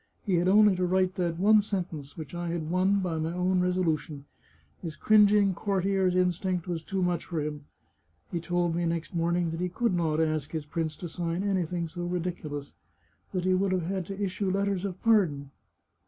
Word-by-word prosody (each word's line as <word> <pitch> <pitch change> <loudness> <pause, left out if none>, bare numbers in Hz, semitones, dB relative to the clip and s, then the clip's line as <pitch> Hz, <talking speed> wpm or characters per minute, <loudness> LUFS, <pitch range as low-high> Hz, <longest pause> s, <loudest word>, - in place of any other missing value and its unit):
He 195 - 0
had 175 +1 +2
only 205 0 +6
to 180 - +1
write 185 0 +2
that 175 -4 -1
one 210 +3 +5
sentence, 175 -8 -5
which 155 -2 -8
I 175 0 -3
had 165 -2 -3
won 190 +2 +2
by 170 -4 -2
my 160 +2 -2
own 180 +1 +1
resolution. 165 -5 -1 0.6
His 165 -3 -5
cringing 205 -1 +5
courtier's 190 -1 0
instinct 180 0 0
was 170 -2 -2
too 190 +2 -2
much 175 -2 0
for 170 -3 -3
him. 150 -1 -4 0.7
He 170 - -1
told 175 0 0
me 170 0 0
next 165 +2 -3
morning 170 0 0
that 165 - -4
he 180 - 0
could 230 +3 0
not 160 -3 +1
ask 155 -2 0
his 155 -2 -3
prince 160 0 -3
to 175 - -6
sign 170 +2 -3
anything 180 -4 -1
so 175 +2 -6
ridiculous 170 -5 -4 0.3
— 80 - -40
that 185 -2 -2
he 185 - +3
would 190 +1 +1
have 180 -3 0
had 185 -1 -3
to 195 0 -6
issue 195 0 -1
letters 195 0 0
of 185 -2 -5
pardon. 165 -12 +2
180 Hz, 200 wpm, -28 LUFS, 165-190 Hz, 0.7 s, only